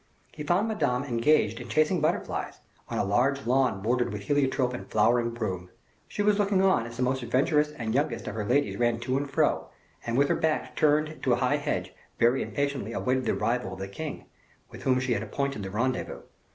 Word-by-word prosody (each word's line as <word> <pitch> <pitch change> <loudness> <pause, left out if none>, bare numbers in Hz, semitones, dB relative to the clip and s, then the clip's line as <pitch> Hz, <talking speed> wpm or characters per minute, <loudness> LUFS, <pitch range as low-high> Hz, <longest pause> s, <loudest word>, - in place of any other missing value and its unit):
He 150 - -9
found 175 +8 +2
Madame 145 - 0
engaged 115 -3 +2
in 120 -1 -9
chasing 155 +5 +2
butterflies, 155 +3 -1 0.3
on - - -3
a - - +2
large 125 +7 +1
lawn 125 -5 +1
bordered 120 +1 +1
with 105 -1 -5
heliotrope 135 -1 +1
and 125 - -7
flowering 120 +2 +3
broom. 95 -6 -4 0.4
She 205 - -2
was 210 0 +3
looking 200 -2 +2
on 185 -12 +3
as 115 0 -10
the 125 - 0
most 130 +1 0
adventurous 150 +5 +2
and 115 -6 -3
youngest 130 -4 -1
of - - -3
her 110 -1 -3
ladies 140 +7 +1
ran 120 -1 +2
to 130 +2 -1
and 140 +1 -1
fro, 135 - +1 0.4
and 115 +1 -2
with 140 +1 +3
her - - +3
back 160 -1 -1
turned 155 +1 +2
to 130 - +2
a 120 +2 0
high 145 +3 +2
hedge, 90 -12 -3 0.2
very 120 +3 +3
impatiently 140 -6 -2
awaited 130 +1 0
the - - +2
arrival 115 -6 -1
of 95 - -9
the 95 - -4
king, 150 +9 -6 0.5
with - - -10
whom 130 -1 +2
she 130 -1 0
had 105 - -1
appointed 140 +3 -3
the 95 - -5
rendezvous. 120 +6 -2
130 Hz, 210 wpm, -27 LUFS, 115-145 Hz, 0.5 s, flowering